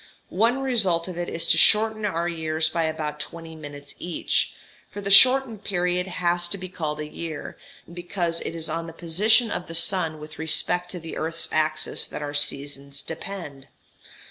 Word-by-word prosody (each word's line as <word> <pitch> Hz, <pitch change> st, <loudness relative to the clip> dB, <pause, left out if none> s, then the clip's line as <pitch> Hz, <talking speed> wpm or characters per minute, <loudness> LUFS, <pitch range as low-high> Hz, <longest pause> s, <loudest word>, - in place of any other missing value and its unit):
(One 230 Hz, +8 st, +2 dB
result 195 Hz, -10 st, +2 dB
of 180 Hz, -, -6 dB
it 175 Hz, 0 st, -3 dB
is 165 Hz, -, -3 dB
to -, -, +4 dB
shorten 215 Hz, 0 st, +4 dB
our 170 Hz, -3 st, -1 dB
years 160 Hz, -2 st, -1 dB
by 165 Hz, 0 st, 0 dB
about 155 Hz, -1 st, -3 dB
20 165 Hz, 0 st, -7 dB
minutes 145 Hz, -2 st, -9 dB
each; 175 Hz, -1 st, -1 dB, 0.3 s
for -, -, -8 dB
the 200 Hz, 0 st, -3 dB
shortened 250 Hz, 0 st, +7 dB
period 180 Hz, -1 st, 0 dB
has 175 Hz, -1 st, 0 dB
to 200 Hz, -, -3 dB
be 185 Hz, -1 st, -7 dB
called 155 Hz, -4 st, -3 dB
a 150 Hz, -, -4 dB
year, 155 Hz, -1 st, -6 dB, 0.4 s
because 175 Hz, -1 st, -3 dB
it 165 Hz, -, -5 dB
is 165 Hz, -1 st, -3 dB
on 165 Hz, +1 st, -3 dB
the 165 Hz, -, -8 dB
position 210 Hz, +8 st, +3 dB
of 175 Hz, -, -4 dB
the 165 Hz, -, -5 dB
sun 165 Hz, -2 st, +2 dB
with 150 Hz, 0 st, -11 dB
respect 175 Hz, +3 st, +1 dB
to 180 Hz, -, -7 dB
the 165 Hz, -1 st, -7 dB
earth's 165 Hz, +1 st, -2 dB
axis 155 Hz, 0 st, +1 dB
that -, -, -6 dB
our 145 Hz, 0 st, -4 dB
seasons 140 Hz, -1 st, -1 dB
depend.) 160 Hz, -5 st, -7 dB
170 Hz, 180 wpm, -25 LUFS, 155-185 Hz, 0.4 s, shortened